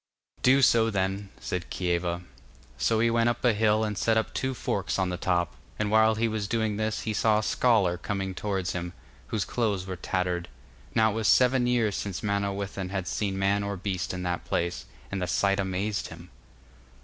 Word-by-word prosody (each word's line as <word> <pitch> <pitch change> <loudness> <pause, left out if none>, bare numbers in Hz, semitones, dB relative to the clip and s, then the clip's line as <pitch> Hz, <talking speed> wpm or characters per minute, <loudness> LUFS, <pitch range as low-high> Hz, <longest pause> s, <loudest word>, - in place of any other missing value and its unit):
'Do 135 +2 +5
so 115 -2 +5
then,' 95 -1 -1
said 90 -1 -4
Kieva. 85 -1 -1 0.6
So 110 - +2
he 115 0 +3
went 115 0 +3
up 120 +1 -2
a 120 - +5
hill 110 0 +2
and 105 -1 -1
set 110 +2 +2
up 110 - -1
two 130 0 -1
forks 100 -5 -2
on 95 -1 +1
the 90 - -2
top, 85 -1 0 0.2
and 105 -1 -1
while 110 0 +5
he 115 +1 +1
was 110 -2 -2
doing 110 -2 0
this 110 0 -1
he 110 - -2
saw 110 0 +3
a 110 - 0
scholar 100 -8 +2
coming 95 0 -3
towards 95 -2 -2
him, 90 0 -4 0.3
whose 105 -3 -1
clothes 105 -6 -1
were 95 -1 -4
tattered. 90 -1 -2 0.5
Now 110 -1 +4
it - - -4
was 110 0 0
seven 125 +1 +4
years 115 -4 +2
since 100 -4 -4
Manawyddan 100 -2 -2
had 95 -2 -3
seen 95 +2 -1
man 100 +1 +2
or 100 -1 -3
beast 95 -2 -2
in 90 0 -4
that 90 -1 -2
place, 85 +1 -2 0.3
and 100 -1 -2
the 90 - -1
sight 100 +1 +2
amazed 100 +2 -1
him. - - -12
100 Hz, 195 wpm, -27 LUFS, 95-110 Hz, 0.6 s, Do